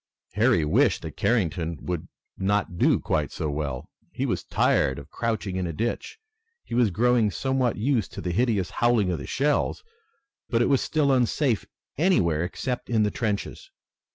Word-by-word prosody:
Harry 110 Hz, -6 st, +3 dB
wished 75 Hz, -, +2 dB
that -, -, -7 dB
Carrington 85 Hz, -7 st, 0 dB
would 90 Hz, -3 st, -4 dB, 0.3 s
not 95 Hz, -2 st, -1 dB
do -, -, +4 dB
quite -, -, -1 dB
so 75 Hz, -, -3 dB
well. 70 Hz, -4 st, -4 dB, 0.2 s
He -, -, -2 dB
was -, -, -1 dB
tired 65 Hz, -, +2 dB
of 70 Hz, -, -10 dB
crouching 110 Hz, -5 st, -2 dB
in 90 Hz, -1 st, -1 dB
a 85 Hz, -, -4 dB
ditch. 120 Hz, -, -3 dB, 0.5 s
He -, -, -9 dB
was 120 Hz, -2 st, +3 dB
growing 115 Hz, +3 st, +3 dB
somewhat 130 Hz, +2 st, 0 dB
used 115 Hz, -, 0 dB
to -, -, -6 dB
the 90 Hz, -, -2 dB
hideous 100 Hz, -2 st, +1 dB
howling 115 Hz, -6 st, +2 dB
of 85 Hz, -, -2 dB
the -, -, -7 dB
shells, 145 Hz, +2 st, 0 dB, 0.7 s
but 115 Hz, -, +2 dB
it 120 Hz, -, +2 dB
was 135 Hz, -, +3 dB
still 150 Hz, -3 st, +1 dB
unsafe 125 Hz, -1 st, +1 dB, 0.3 s
anywhere 85 Hz, -, +3 dB
except 125 Hz, +7 st, -4 dB
in 110 Hz, -3 st, +3 dB
the 105 Hz, -, +1 dB
trenches. 105 Hz, -4 st, -3 dB
105 Hz, 170 wpm, -25 LUFS, 90-125 Hz, 0.7 s, do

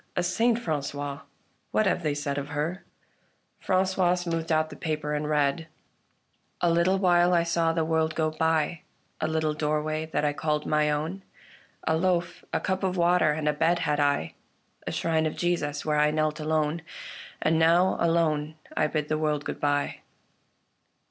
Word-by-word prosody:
A 180 Hz, -, +1 dB
saint, 225 Hz, +6 st, +2 dB
Frangois! 145 Hz, -, -3 dB, 0.5 s
What 215 Hz, -, +2 dB
have 185 Hz, -, +1 dB
they 150 Hz, -3 st, -1 dB
said 145 Hz, -1 st, -2 dB
of 140 Hz, -, -5 dB
her? 155 Hz, +6 st, -3 dB, 0.4 s
" -, -, -43 dB
Francois 185 Hz, -1 st, +2 dB
smoothed 165 Hz, -2 st, -3 dB
out 155 Hz, 0 st, +1 dB
the -, -, -8 dB
paper 155 Hz, -2 st, -3 dB
and 150 Hz, 0 st, -2 dB
read: 150 Hz, +1 st, +1 dB, 0.5 s
" -, -, -44 dB
A 175 Hz, -, +3 dB
little 170 Hz, +3 st, +3 dB
while 180 Hz, -1 st, +4 dB
I 170 Hz, -, +3 dB
saw 170 Hz, -1 st, +1 dB
the 165 Hz, -1 st, 0 dB
world 160 Hz, 0 st, 0 dB
go 155 Hz, -1 st, +1 dB
by 160 Hz, +1 st, 0 dB, 0.2 s
— -, -, -23 dB
A -, -, +1 dB
little 160 Hz, -1 st, 0 dB
doorway 155 Hz, +1 st, -1 dB
that 150 Hz, -1 st, -1 dB
I 145 Hz, -, +1 dB
called 150 Hz, 0 st, -1 dB
my 150 Hz, 0 st, +2 dB
own, 155 Hz, +6 st, -2 dB, 0.7 s
A 160 Hz, -, +3 dB
loaf, 175 Hz, 0 st, 0 dB
a -, -, 0 dB
cup 190 Hz, 0 st, -2 dB
of 190 Hz, -1 st, -1 dB
water, 175 Hz, -2 st, +3 dB
and 150 Hz, 0 st, -3 dB
a 150 Hz, -, +3 dB
bed 165 Hz, +3 st, +2 dB
had 150 Hz, 0 st, +1 dB
I, 145 Hz, 0 st, +1 dB, 0.5 s
A -, -, -1 dB
shrine 160 Hz, -1 st, +1 dB
of 155 Hz, -, -4 dB
Jesus, 165 Hz, -4 st, -1 dB
where 150 Hz, -1 st, +1 dB
I 150 Hz, 0 st, +4 dB
knelt 155 Hz, 0 st, 0 dB
alone: 155 Hz, +1 st, 0 dB, 0.6 s
And 160 Hz, +1 st, +2 dB
now 170 Hz, +3 st, +4 dB
alone 160 Hz, -2 st, +1 dB, 0.2 s
I -, -, +2 dB
bid 150 Hz, -1 st, -2 dB
the 155 Hz, 0 st, -1 dB
world 150 Hz, -2 st, -1 dB
good -, -, -4 dB
bye." 145 Hz, 0 st, 0 dB
160 Hz, 180 wpm, -27 LUFS, 150-170 Hz, 0.7 s, while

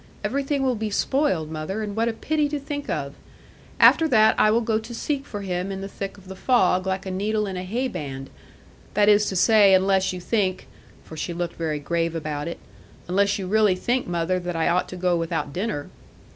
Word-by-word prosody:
Everything 280 Hz, 0 st, -1 dB
will 260 Hz, -1 st, +2 dB
be 220 Hz, -2 st, -3 dB
spoiled, 200 Hz, -, 0 dB
mother, 160 Hz, +8 st, -4 dB
and 205 Hz, -1 st, -5 dB
what 225 Hz, +1 st, +1 dB
a 230 Hz, -, 0 dB
pity 300 Hz, +5 st, 0 dB
to 295 Hz, 0 st, -2 dB
think 285 Hz, +1 st, -6 dB
of! 140 Hz, -3 st, -3 dB, 0.7 s
After 325 Hz, -, +6 dB
that 220 Hz, -5 st, +5 dB
I 215 Hz, -, +5 dB
will 225 Hz, +2 st, +3 dB
go 220 Hz, -1 st, 0 dB
to 230 Hz, +2 st, -9 dB
seek 280 Hz, +3 st, -3 dB
for 205 Hz, -, -6 dB
him 185 Hz, 0 st, -3 dB
in 195 Hz, 0 st, -5 dB
the 195 Hz, -, -5 dB
thick 195 Hz, 0 st, -6 dB
of 195 Hz, -2 st, -16 dB
the 190 Hz, -, -8 dB
fog, 185 Hz, -4 st, +2 dB
like 190 Hz, +1 st, -2 dB
a 190 Hz, -, -4 dB
needle 210 Hz, +3 st, -1 dB
in 195 Hz, -2 st, -5 dB
a 180 Hz, -, -3 dB
hay 230 Hz, +8 st, -2 dB
band. 135 Hz, -, -6 dB, 0.6 s
That 205 Hz, 0 st, +4 dB
is 210 Hz, 0 st, +5 dB
to 190 Hz, -, -3 dB
say, 205 Hz, 0 st, +6 dB
unless 190 Hz, 0 st, +2 dB
you 185 Hz, -, -6 dB
think' 185 Hz, 0 st, -1 dB, 0.4 s
for 160 Hz, -, -11 dB
she 170 Hz, +2 st, -4 dB
looked 170 Hz, 0 st, -4 dB
very 160 Hz, -2 st, -2 dB
grave 165 Hz, +3 st, -1 dB
about 150 Hz, -1 st, -3 dB
it 170 Hz, -, -5 dB, 0.5 s
'unless 200 Hz, +3 st, +2 dB
you 195 Hz, -, -4 dB
really 210 Hz, 0 st, +3 dB
think, 245 Hz, +7 st, -1 dB
mother, 175 Hz, +1 st, 0 dB
that 175 Hz, -1 st, -4 dB
I 165 Hz, -, +1 dB
ought 180 Hz, +1 st, +1 dB
to -, -, -7 dB
go 180 Hz, -1 st, +1 dB
without 165 Hz, -3 st, -2 dB
dinner.' 185 Hz, -5 st, -3 dB
195 Hz, 220 wpm, -24 LUFS, 175-220 Hz, 0.7 s, After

